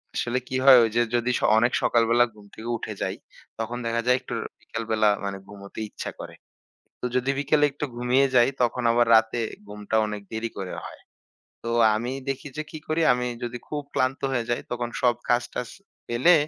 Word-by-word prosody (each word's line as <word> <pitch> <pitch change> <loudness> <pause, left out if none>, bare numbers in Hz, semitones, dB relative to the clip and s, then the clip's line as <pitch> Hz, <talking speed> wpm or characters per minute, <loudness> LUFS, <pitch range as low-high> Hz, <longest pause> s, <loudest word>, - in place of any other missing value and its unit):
আসলে 120 +1 0
কি 130 - -4
হয়? 135 -2 +10
ঐ - - +5
যে 120 - +4
যদি 120 +1 +1
স - - -10 0.2
অনেক 120 +3 +3
সকালবেলা 120 +1 +4
ঘুম 105 -1 -16
থেকে 110 - -8
উঠে - - -6
যাই। - - -1 0.4
তখন 120 +2 -3
দেখা 115 0 0
যায় 125 0 +5
একটু - - -7 0.3
বিকালবেলা 110 -2 0 0.2
মানে 100 -1 -3
ঘুমোতে 100 0 -10
ইচ্ছা - - -6
করে। - - -8 0.7
তো - - -7
যদি 125 +2 +1
বিকেলে 145 +1 +3
একটু 145 - -4
ঘুমিয়ে 125 +3 +3
যাই, 120 +1 +6
তখন 120 +1 0
আবার 120 0 +3
রাতে 110 +1 +2 0.3
ঘুমটা 105 +1 -3
অনেক 105 -1 -5
দেরি 110 +1 -3
করে 95 -2 -4
হয়। - - -11 0.6
তো - - -3 0.3
আমি 120 +4 -3 0.2
দেখি 135 +1 -3
যে 155 - -2
কি 155 - -7
করি? 155 +1 0
আমি 125 0 -1 0.2
যদি 120 0 -4
খুব 150 -1 -3
ক্লান্ত 130 +1 +1
হয়ে 120 -3 0
যাই। 120 - 0
তখন 120 0 -2
সব 120 -1 +4
কাজ-টাজ 120 0 0 0.4
ফেলে 130 +9 +4
120 Hz, 190 wpm, -25 LUFS, 110-125 Hz, 0.7 s, হয়